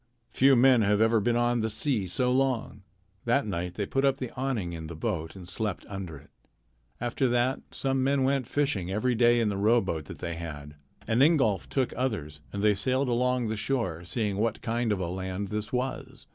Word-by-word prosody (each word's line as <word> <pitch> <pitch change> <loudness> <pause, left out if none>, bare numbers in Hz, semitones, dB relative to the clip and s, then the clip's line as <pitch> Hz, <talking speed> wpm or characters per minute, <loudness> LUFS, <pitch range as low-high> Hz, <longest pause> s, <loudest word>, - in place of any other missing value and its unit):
"Few 135 +2 +5
men 125 -1 +6
have 105 0 +2
ever 115 0 +4
been 120 +3 +1
on 120 0 +2
the 110 - 0
sea 110 -2 0
so 125 +8 +1
long." 130 -5 0 0.4
That 120 +4 +2
night 90 -3 -3
they 100 - -2
put 135 +7 -1
up 135 -1 +3
the 130 -3 -5
awning 125 -10 -2
in 80 -1 -6
the 85 - -7
boat 80 -3 -3
and 90 -2 -10
slept 100 +1 -2
under 95 -6 -6
it. - - -18 0.7
After 120 +2 0
that 120 +2 +1
some 135 -1 -1
men 135 0 +2
went 135 -2 +1
fishing 135 -12 0
every 110 +6 0
day 120 0 +4
in 115 -2 +2
the 100 - -2
rowboat 100 -7 +1
that - - -9
they 85 -1 -5
had. 75 -3 -7 0.3
And 115 +3 +2
Ingolf 135 - +3
took 130 -3 0
others, 100 - -3
and 100 0 -4
they 105 -1 +5
sailed 130 +6 0
along 125 -1 +1
the 110 - -1
shore, 105 -9 -2
seeing 100 +2 -2
what 110 +1 -1
kind 120 -1 0
of 100 - 0
a 90 - -1
land 95 +2 -4
this 105 0 -4
was. 130 +1 -4
110 Hz, 205 wpm, -28 LUFS, 95-125 Hz, 0.7 s, men